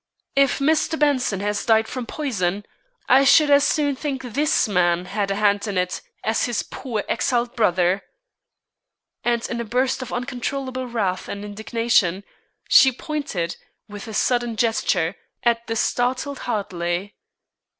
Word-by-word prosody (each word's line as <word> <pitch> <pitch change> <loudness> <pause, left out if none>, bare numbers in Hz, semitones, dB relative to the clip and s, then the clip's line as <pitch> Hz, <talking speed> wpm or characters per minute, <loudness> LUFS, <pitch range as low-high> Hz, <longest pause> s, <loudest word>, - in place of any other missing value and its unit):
If 275 -1 +3
Mr. 315 +2 +1
Benson 265 -10 +1
has 205 0 -1
died 220 -1 +3
from 250 -2 -5
poison, 205 - -2 0.4
I 265 +2 +6
should 290 +2 +5
as 285 0 +6
soon 290 -2 +1
think 270 -1 -4
this 275 +2 +1
man 180 -3 +1
had 200 +1 -2
a 195 - 0
hand 205 0 +2
in 200 -2 -2
it 180 0 -1 0.2
as 220 +1 +1
his 240 -3 -1
poor 235 -6 -5
exiled 240 -1 0
brother." 185 -3 +2 1.2
And 235 -1 0
in 235 -1 -3
a - - -2
burst 255 +4 0
of 255 - -6
uncontrollable 255 +1 -3
wrath 200 -6 -2
and 200 0 -5
indignation, 210 -3 0 0.4
she 265 - +7
pointed, 250 - -4 0.3
with 205 +1 -9
a 220 - -7
sudden 240 -1 +1
gesture, 200 -6 0 0.3
at 235 -1 +1
the 225 - -2
startled 255 +5 -1
Hartley. 185 -2 -2
230 Hz, 145 wpm, -22 LUFS, 200-260 Hz, 1.2 s, she